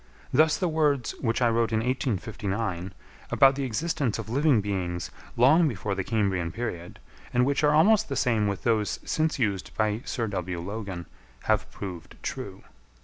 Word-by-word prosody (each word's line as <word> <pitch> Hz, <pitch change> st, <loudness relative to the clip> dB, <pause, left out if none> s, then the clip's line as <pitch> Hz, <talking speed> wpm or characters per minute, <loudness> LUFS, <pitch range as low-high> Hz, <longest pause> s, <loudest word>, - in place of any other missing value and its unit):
Thus 155 Hz, +3 st, +4 dB
the 180 Hz, -, 0 dB
words, 150 Hz, -5 st, +1 dB
which 115 Hz, 0 st, +1 dB
I 120 Hz, -, +5 dB
wrote 115 Hz, 0 st, +1 dB
in 110 Hz, 0 st, +1 dB
1859, 105 Hz, -, -2 dB, 0.4 s
about 135 Hz, 0 st, +6 dB
the 135 Hz, 0 st, -2 dB
existence 140 Hz, 0 st, -1 dB
of 115 Hz, -1 st, -6 dB
living 140 Hz, -1 st, +4 dB
beings 95 Hz, -4 st, -3 dB, 0.3 s
long 155 Hz, +8 st, +6 dB
before 105 Hz, -5 st, -2 dB
the 95 Hz, 0 st, -2 dB
Cambrian 95 Hz, -6 st, 0 dB
period, 90 Hz, -5 st, -5 dB, 0.3 s
and 125 Hz, 0 st, +3 dB
which 140 Hz, +2 st, +1 dB
are 150 Hz, 0 st, +4 dB
almost 200 Hz, +6 st, +5 dB
the 140 Hz, -, -2 dB
same 115 Hz, -6 st, +2 dB
with 100 Hz, -2 st, -3 dB
those 110 Hz, -3 st, +1 dB
since 155 Hz, 0 st, 0 dB
used 100 Hz, -7 st, -2 dB
by 110 Hz, 0 st, +1 dB
Sir 120 Hz, -, -2 dB
W. 90 Hz, -4 st, -3 dB
Logan, 95 Hz, -1 st, -5 dB, 0.4 s
have -, -, +1 dB
proved 90 Hz, -4 st, -8 dB
true. -, -, -5 dB
115 Hz, 165 wpm, -27 LUFS, 100-135 Hz, 0.4 s, about